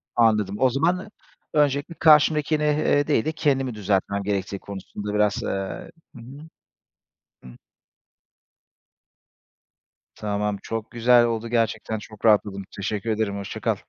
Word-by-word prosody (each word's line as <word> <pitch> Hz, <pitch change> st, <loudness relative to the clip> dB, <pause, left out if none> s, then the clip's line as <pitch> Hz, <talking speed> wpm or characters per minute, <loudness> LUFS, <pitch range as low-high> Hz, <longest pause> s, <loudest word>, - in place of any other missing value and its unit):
Anladım. 105 Hz, -4 st, +2 dB
O 130 Hz, -, +4 dB
zaman 175 Hz, -, 0 dB, 0.4 s
öncelikle 145 Hz, +2 st, +1 dB
karşımdakini, 150 Hz, -1 st, +4 dB
eee, 150 Hz, -1 st, +2 dB
değil 145 Hz, -7 st, +1 dB
de 155 Hz, -, 0 dB
kendimi 135 Hz, -6 st, 0 dB
düzeltmem 100 Hz, 0 st, -1 dB
gerektiği 100 Hz, -1 st, -2 dB
konusunda 100 Hz, +1 st, -7 dB
biraz, 105 Hz, -1 st, +1 dB
eee -, -, -2 dB, 0.7 s
Hı 120 Hz, -, -11 dB
hı. 140 Hz, +6 st, -12 dB, 1.0 s
Hı. -, -, -11 dB, 2.7 s
Tamam, 105 Hz, -1 st, -2 dB
çok 115 Hz, -1 st, -5 dB
güzel 120 Hz, +1 st, +4 dB
oldu. 115 Hz, 0 st, -2 dB
Gerçekten 115 Hz, -2 st, -1 dB
çok 105 Hz, 0 st, -10 dB
rahatladım. 105 Hz, -2 st, +3 dB
Teşekkür 105 Hz, +3 st, -3 dB
ederim, 105 Hz, -2 st, -1 dB
hoşça 100 Hz, -1 st, -6 dB
kal. -, -, +1 dB
115 Hz, 120 wpm, -24 LUFS, 105-145 Hz, 2.7 s, O